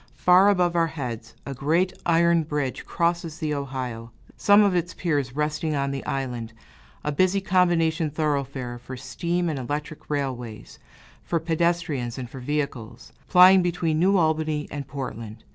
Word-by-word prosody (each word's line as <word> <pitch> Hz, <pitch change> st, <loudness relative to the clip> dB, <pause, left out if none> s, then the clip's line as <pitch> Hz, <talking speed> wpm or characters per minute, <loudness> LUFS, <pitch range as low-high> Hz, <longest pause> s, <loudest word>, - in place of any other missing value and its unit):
Far 185 Hz, +3 st, +5 dB
above 180 Hz, -3 st, +2 dB
our 165 Hz, -1 st, +3 dB
heads 120 Hz, -8 st, -6 dB
a 140 Hz, -, -5 dB
great 165 Hz, +8 st, +1 dB
iron 170 Hz, 0 st, +4 dB
bridge 150 Hz, -4 st, -3 dB
crosses 170 Hz, -1 st, -1 dB
the 155 Hz, -2 st, -2 dB
Ohio, 130 Hz, -5 st, -5 dB, 0.3 s
some 205 Hz, +1 st, +5 dB
of 200 Hz, -2 st, +3 dB
its 175 Hz, 0 st, -1 dB
piers 145 Hz, -7 st, -1 dB
resting 150 Hz, +1 st, -1 dB
on 140 Hz, -1 st, -1 dB
the 135 Hz, -1 st, -4 dB
island, 125 Hz, -4 st, -3 dB, 0.5 s
a 150 Hz, -, -1 dB
busy 185 Hz, +6 st, +2 dB
combination 175 Hz, -4 st, +2 dB
thoroughfare 140 Hz, -5 st, -2 dB
for 130 Hz, +1 st, -8 dB
steam 170 Hz, +7 st, -2 dB
and 155 Hz, -4 st, -2 dB
electric 145 Hz, +4 st, -5 dB
railways, 130 Hz, -6 st, -4 dB, 0.4 s
for 170 Hz, -, -1 dB
pedestrians 160 Hz, -7 st, -1 dB
and 125 Hz, -2 st, -6 dB
for 135 Hz, -, -8 dB
vehicles, 135 Hz, -4 st, -4 dB
plying 185 Hz, +1 st, +7 dB
between 170 Hz, -3 st, 0 dB
New 195 Hz, +3 st, +4 dB
Albany 155 Hz, -2 st, 0 dB
and 140 Hz, -2 st, -5 dB
Portland. 115 Hz, -6 st, -7 dB
150 Hz, 150 wpm, -25 LUFS, 130-170 Hz, 0.5 s, plying